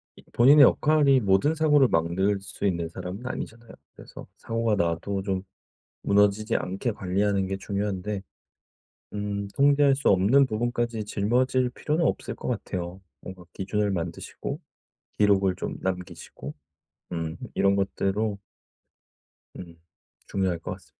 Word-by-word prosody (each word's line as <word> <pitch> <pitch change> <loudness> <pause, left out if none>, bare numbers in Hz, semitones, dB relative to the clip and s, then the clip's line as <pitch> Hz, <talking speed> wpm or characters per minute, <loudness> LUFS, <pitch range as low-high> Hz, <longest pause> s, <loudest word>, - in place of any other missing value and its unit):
이 - - -17
본인의 140 +5 +7
역할이 145 -1 +4
모든 100 +10 +3
사고를 150 -4 +4
막을 95 +5 +1
수 100 - -6
있는 85 -4 0
사람은 90 +7 -7
아니잖아요. 115 -2 -6 0.3
그래서 - - -12
사고가 115 -1 -1
나도 90 +2 -1
좀 95 -1 -2 0.6
무너지지 105 +2 +2
않게 95 +6 -3
관리하는 100 0 0
게 95 0 -3
중요한데 100 0 -3 0.9
음 100 -1 -3
통제할 140 0 +4
수 145 - +1
없는 105 +9 +5
부분까지 120 -1 -2
짊어질 125 +5 +1
필요는 155 +5 -1
없을 - - -2
것 - - -7
같아요. 90 -5 -4 0.2
뭔가 95 -2 -10
기준을 100 +1 -1
만드시고 85 -2 -5 0.6
기록을 100 -3 +3
좀 - - -5
남기시고 90 -6 -5 0.6
음 80 -1 -3 0.2
이런 100 0 +3
것대로 100 +1 -1 1.2
음. 85 -2 -10 0.5
중요할 95 -3 -1
것 - - -6
같습니다. - - -10
100 Hz, 295 characters per minute, -26 LUFS, 95-120 Hz, 1.2 s, 본인의